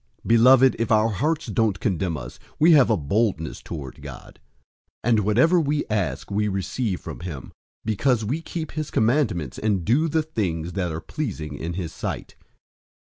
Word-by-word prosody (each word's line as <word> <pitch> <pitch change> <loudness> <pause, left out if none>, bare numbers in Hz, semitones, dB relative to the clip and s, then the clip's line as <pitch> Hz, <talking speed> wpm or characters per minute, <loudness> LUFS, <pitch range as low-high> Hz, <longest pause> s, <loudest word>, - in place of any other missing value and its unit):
003:021 - - -8
Beloved, 130 +3 +6
if 115 -1 -1
our 110 +1 +4
hearts 150 - -1
don't 110 -2 0
condemn 90 -5 -1
us, - - -9 0.2
we 165 +3 +5
have 145 -5 +7
boldness 100 -3 0
toward 70 -6 -8
God; - - -11 0.7
003:022 - - +2
and 110 - +4
whatever 125 - +3
we 145 0 0
ask, 90 -7 -2
we 105 +1 +1
receive 100 +1 -2
from - - -8
him, 80 -7 -7 0.3
because 110 +1 +1
we 140 +10 -2
keep 160 -2 -5
his 155 -1 -4
commandments 110 - 0
and 100 -5 0
do 140 +9 +3
the 160 0 +1
things 90 - -3
that 90 -3 -2
are 80 +1 -4
pleasing 80 - -5
in 80 +4 -4
his 85 -3 -5
sight. - - -5
110 Hz, 170 wpm, -24 LUFS, 85-135 Hz, 0.7 s, have